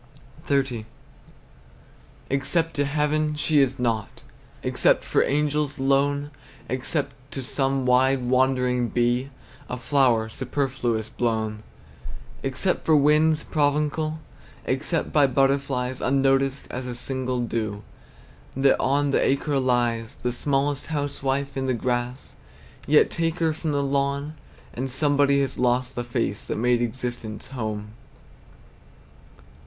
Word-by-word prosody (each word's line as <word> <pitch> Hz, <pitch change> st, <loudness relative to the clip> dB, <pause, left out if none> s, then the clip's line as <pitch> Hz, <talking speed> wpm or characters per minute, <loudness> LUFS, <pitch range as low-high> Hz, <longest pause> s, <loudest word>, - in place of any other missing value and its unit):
XXX. 135 Hz, -6 st, 0 dB, 1.5 s
Except 160 Hz, +4 st, +1 dB
to 145 Hz, -, +1 dB
heaven, 150 Hz, +1 st, 0 dB
she 150 Hz, 0 st, +2 dB
is 135 Hz, -2 st, +2 dB
nought; 115 Hz, -3 st, -2 dB, 0.4 s
Except -, -, +2 dB
for -, -, +2 dB
angels, 150 Hz, 0 st, 0 dB
lone; 140 Hz, +1 st, +1 dB, 0.4 s
Except 130 Hz, +4 st, -1 dB, 0.2 s
to 135 Hz, -, -5 dB
some 135 Hz, 0 st, 0 dB
wide 130 Hz, +1 st, +3 dB
wandering 125 Hz, -1 st, +2 dB
bee, 120 Hz, +3 st, 0 dB, 0.4 s
A 125 Hz, -, -3 dB
flower 125 Hz, -3 st, +2 dB
superfluous 125 Hz, -2 st, -2 dB
blown; 110 Hz, -2 st, -2 dB, 0.8 s
Except 135 Hz, +8 st, -1 dB
for 160 Hz, -, +4 dB
winds, 150 Hz, +2 st, +3 dB
provincial; 150 Hz, +1 st, 0 dB, 0.5 s
Except 135 Hz, +5 st, -1 dB
by 145 Hz, -2 st, +5 dB
butterflies, 135 Hz, -1 st, 0 dB
Unnoticed 135 Hz, 0 st, +2 dB
as 125 Hz, 0 st, -5 dB
a 120 Hz, -, -4 dB
single 130 Hz, 0 st, -2 dB
dew 110 Hz, -3 st, -3 dB, 0.7 s
That 135 Hz, 0 st, +4 dB
on 140 Hz, +1 st, +1 dB
the -, -, +2 dB
acre 140 Hz, +1 st, +1 dB
lies. 120 Hz, -1 st, 0 dB
The 125 Hz, -, +1 dB
smallest 140 Hz, +2 st, -1 dB
housewife 140 Hz, -2 st, -2 dB
in 135 Hz, -1 st, -2 dB
the 130 Hz, -, +1 dB
grass, 125 Hz, +2 st, -3 dB, 0.5 s
Yet 150 Hz, +1 st, +5 dB
take 165 Hz, 0 st, -1 dB
her 160 Hz, -2 st, +1 dB
from 160 Hz, 0 st, -3 dB
the 140 Hz, -1 st, 0 dB
lawn, 140 Hz, +2 st, -1 dB, 0.4 s
And 130 Hz, +2 st, -3 dB
somebody 140 Hz, +1 st, +3 dB
has 135 Hz, -2 st, -2 dB
lost 125 Hz, +1 st, +1 dB
the 120 Hz, -, -3 dB
face 120 Hz, -4 st, -2 dB
That -, -, -3 dB
made 120 Hz, +1 st, +2 dB
existence 120 Hz, -2 st, -4 dB
home! 110 Hz, -5 st, -4 dB
135 Hz, 120 wpm, -24 LUFS, 125-145 Hz, 1.5 s, by